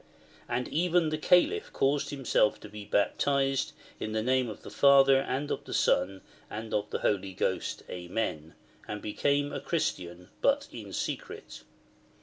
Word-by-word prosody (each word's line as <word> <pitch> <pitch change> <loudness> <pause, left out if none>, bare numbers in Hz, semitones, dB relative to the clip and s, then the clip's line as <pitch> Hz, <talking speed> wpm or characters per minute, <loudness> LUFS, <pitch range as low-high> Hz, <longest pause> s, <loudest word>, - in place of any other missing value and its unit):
And 125 +1 -1
even 170 0 +2
the 155 - -1
Calif 180 - +3
caused 140 +1 +1
himself 135 -6 +1
to 105 - -10
be 105 0 -9
baptised 135 +6 +1 0.3
in 110 - -4
the 110 0 0
name 130 0 +2
of 105 - -9
the - - -9
Father 135 -1 +6
and 135 +2 -2
of - - -2
the - - -4
Son 95 +2 +2 0.3
and 110 +1 -6
of 105 0 0
the - - -3
Holy 100 -2 0
Ghost, - - -2
Amen, 90 -3 -4 0.3
and 105 - -4
became 140 +7 0
a - - -2
Christian, 90 - -3
but 280 +1 +2
in - - -8
secret. - - -5
125 Hz, 155 wpm, -29 LUFS, 105-145 Hz, 0.3 s, Father